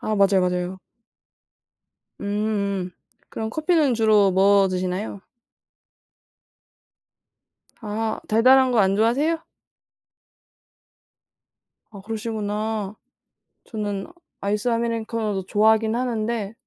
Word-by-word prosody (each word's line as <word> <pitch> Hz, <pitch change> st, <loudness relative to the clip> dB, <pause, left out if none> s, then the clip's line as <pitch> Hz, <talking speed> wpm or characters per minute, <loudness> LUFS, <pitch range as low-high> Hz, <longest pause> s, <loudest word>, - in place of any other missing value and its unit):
아 215 Hz, -, -2 dB
맞아요, 195 Hz, -1 st, +4 dB
맞아요. 180 Hz, 0 st, -1 dB, 1.4 s
음 -, -, -6 dB
음. 200 Hz, -2 st, -1 dB, 0.4 s
그럼 220 Hz, 0 st, -4 dB
커피는 310 Hz, -2 st, +2 dB
주로 215 Hz, -3 st, +4 dB
뭐 195 Hz, +1 st, +4 dB
드시나요? 185 Hz, +2 st, -3 dB, 2.6 s
아. 220 Hz, 0 st, -3 dB
달달한 255 Hz, +4 st, +5 dB
거 240 Hz, -, +2 dB
안 195 Hz, 0 st, +2 dB
좋아하세요? 285 Hz, +10 st, +1 dB, 2.5 s
아 205 Hz, -3 st, -11 dB
그러시구나. 215 Hz, -1 st, -3 dB, 0.7 s
저는 205 Hz, -3 st, -4 dB, 0.3 s
아이스 210 Hz, +4 st, -1 dB
아메리카노도 230 Hz, -4 st, -1 dB
좋아하기는 220 Hz, +3 st, +2 dB
하는데 230 Hz, -4 st, -2 dB
215 Hz, 205 characters per minute, -23 LUFS, 200-230 Hz, 2.6 s, 달달한